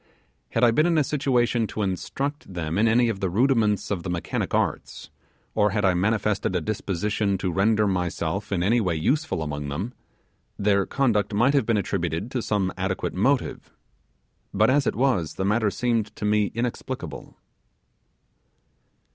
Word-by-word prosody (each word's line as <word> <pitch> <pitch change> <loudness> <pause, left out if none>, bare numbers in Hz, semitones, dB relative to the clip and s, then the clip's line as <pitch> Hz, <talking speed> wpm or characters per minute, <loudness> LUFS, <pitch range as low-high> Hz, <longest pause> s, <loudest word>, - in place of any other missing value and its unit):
Had 115 - +1
I 120 - +6
been 155 +8 +3
in 170 -2 +2
a 155 - +4
situation 125 -5 +1
to 105 - -3
instruct 135 +8 -3
them 85 0 -2
in 115 - +4
any 120 +2 +4
of 110 -4 -2
the 95 - -1
rudiments 105 -1 +2
of 95 -4 -1
the 90 - -5
mechanic 85 -1 -2
arts, - - -2 0.4
or 105 -1 +3
had 105 0 0
I 95 - +4
manifested 100 0 0
a - - +2
disposition 100 +2 -1
to 95 -1 -2
render 105 +4 +2
myself 90 0 -2
in 90 -3 0
any 115 +5 +3
way 90 -5 0
useful 135 - 0
among 75 -1 -4
them, 95 - -4 0.6
their 100 -1 +2
conduct 110 -7 +1
might 120 +7 +3
have 135 -6 +2
been 115 -2 +2
attributed 95 +1 -2
to 125 - -1
some 100 -4 -1
adequate 95 0 -2
motive, 125 +8 0 0.8
but - - +3
as 140 -1 +2
it - - 0
was, 115 - +1
the 95 - -2
matter 105 +1 +2
seemed 115 -1 -1
to - - -4
me 105 0 +2
inexplicable. 120 +1 -5
105 Hz, 165 wpm, -25 LUFS, 95-120 Hz, 0.8 s, I